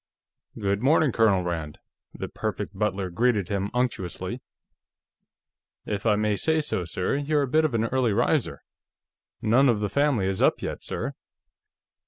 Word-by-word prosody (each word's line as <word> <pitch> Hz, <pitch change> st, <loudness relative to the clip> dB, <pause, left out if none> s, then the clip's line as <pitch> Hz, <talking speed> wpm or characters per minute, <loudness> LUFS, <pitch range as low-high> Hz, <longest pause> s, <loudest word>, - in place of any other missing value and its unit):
"Good 100 Hz, 0 st, -1 dB
morning, 150 Hz, +1 st, +4 dB
Colonel 105 Hz, -5 st, +3 dB
Rand," 80 Hz, -4 st, -4 dB, 0.3 s
the -, -, -6 dB
Perfect -, -, -4 dB
Butler 95 Hz, -2 st, -1 dB
greeted 105 Hz, -1 st, +1 dB
him 100 Hz, 0 st, -1 dB
unctuously. 120 Hz, -8 st, -2 dB, 1.4 s
"If 105 Hz, +2 st, -2 dB
I 105 Hz, -, +4 dB
may 105 Hz, 0 st, +1 dB
say 160 Hz, +11 st, +1 dB
so, 120 Hz, -, -2 dB
sir, 90 Hz, +10 st, -1 dB
you're 145 Hz, 0 st, +1 dB
a -, -, -1 dB
bit 155 Hz, +5 st, +3 dB
of 140 Hz, -6 st, 0 dB
an 115 Hz, 0 st, +1 dB
early 125 Hz, -1 st, +1 dB
riser. 110 Hz, -, 0 dB, 0.8 s
None 125 Hz, +5 st, +4 dB
of 115 Hz, -3 st, +2 dB
the 105 Hz, -1 st, -1 dB
family 140 Hz, -7 st, +2 dB
is 95 Hz, 0 st, -1 dB
up -, -, +3 dB
yet, -, -, -4 dB
sir." -, -, -3 dB
110 Hz, 155 wpm, -26 LUFS, 95-130 Hz, 1.4 s, morning